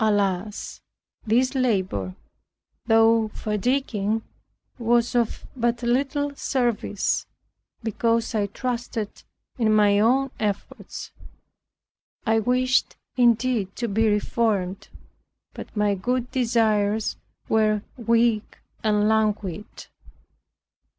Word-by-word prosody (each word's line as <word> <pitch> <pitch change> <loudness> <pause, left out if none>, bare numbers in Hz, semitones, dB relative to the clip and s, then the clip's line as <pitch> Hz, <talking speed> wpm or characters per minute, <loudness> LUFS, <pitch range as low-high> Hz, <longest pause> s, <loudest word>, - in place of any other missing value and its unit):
Alas! 205 -1 -1 0.5
this 250 +4 +3
labor, 185 - 0 0.7
though 225 0 +5
fatiguing, 220 -1 -1 0.6
was 235 +1 +2
of 235 -2 0
but 240 -1 0
little 280 +4 0
service, 240 -8 -1 0.6
because 230 +1 0
I 210 -2 +1
trusted 235 -1 -4 0.4
in 220 -2 +3
my 205 -1 +4
own 260 +5 +3
efforts. 205 -2 -4 1.1
I 225 -1 +3
wished 250 +2 +1 0.2
indeed 240 -4 +2
to 235 - -2
be 220 +1 +2
reformed, 205 -3 0 0.7
but - - -9
my 210 -1 +2
good 245 +5 -2
desires 220 -4 +1 0.3
were 215 -1 +2
weak 230 -2 +1 0.3
and 210 -1 +2
languid. 210 -4 -1
225 Hz, 90 wpm, -24 LUFS, 210-240 Hz, 1.1 s, though